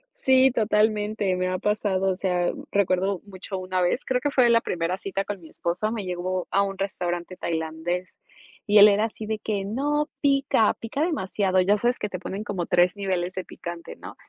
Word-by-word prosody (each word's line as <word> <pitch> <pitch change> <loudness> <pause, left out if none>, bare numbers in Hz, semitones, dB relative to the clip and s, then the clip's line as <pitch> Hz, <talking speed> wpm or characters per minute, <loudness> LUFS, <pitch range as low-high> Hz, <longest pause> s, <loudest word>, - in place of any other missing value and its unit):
Sí, 265 0 +4
totalmente, 210 -3 +1
me 185 0 -1
ha 185 - -1
pasado, 195 -1 0
o - - -1
sea, 180 -2 0
mm, - - -9
recuerdo 190 -1 +1
mucho 190 0 -7
una 185 0 -2
vez. 180 +9 0
Creo 250 -1 0
que 290 - 0
fue 250 -3 +4
la 230 0 +5
primera 175 +2 -2
cita 195 0 -3
con 205 -3 -5
mi 160 - -13
esposo, 180 +6 -2
me 220 -4 -4
llevo 180 0 -3
a 200 - +3
un 195 -1 -2
restaurante 180 -2 -3
tailandés, 165 +2 -3 0.5
y 210 +1 +5
él 205 +1 +10
era 210 +1 +3
así 220 -1 -6
de 215 0 -3
que: 205 -2 -2
"No, 290 +8 0
pica, 275 -6 +3
pica 230 +5 -4
demasiado". 195 - 0
Ya 200 +3 +3
sabes 240 +3 +1
que 210 - -3
te 185 - -5
ponen 195 +3 -5
como 190 -5 -3
3 180 +2 +3
niveles 185 -3 -2
de 185 - -4
picante, 170 -1 -8
¿no? - - -10
195 Hz, 200 wpm, -25 LUFS, 180-215 Hz, 0.5 s, él